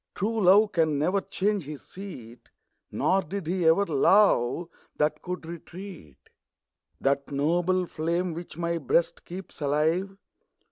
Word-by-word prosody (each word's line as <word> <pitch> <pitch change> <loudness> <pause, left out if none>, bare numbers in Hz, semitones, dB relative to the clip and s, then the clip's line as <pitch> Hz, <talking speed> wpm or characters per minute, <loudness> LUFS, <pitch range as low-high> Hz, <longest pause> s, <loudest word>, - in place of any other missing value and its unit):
True 220 0 0
love 205 +3 +6
can 160 -4 +1
never 180 +7 +1
change 200 -3 -1
his 150 0 -8
seat; 130 - -10 0.4
Nor 195 +1 +2
did 195 +2 -5
he 175 0 0
ever 165 +5 +5
love 165 - +3 0.3
that 150 +1 0
can 180 0 -5
retreat. 170 - -10 0.8
That 140 0 0
noble 175 +6 +1
flame, 170 +2 -2
which 170 -1 -8
my 170 0 -1
Ijreast 160 +4 0
keeps 180 -2 -9
alive. 160 +7 0
170 Hz, 130 wpm, -27 LUFS, 150-190 Hz, 0.8 s, love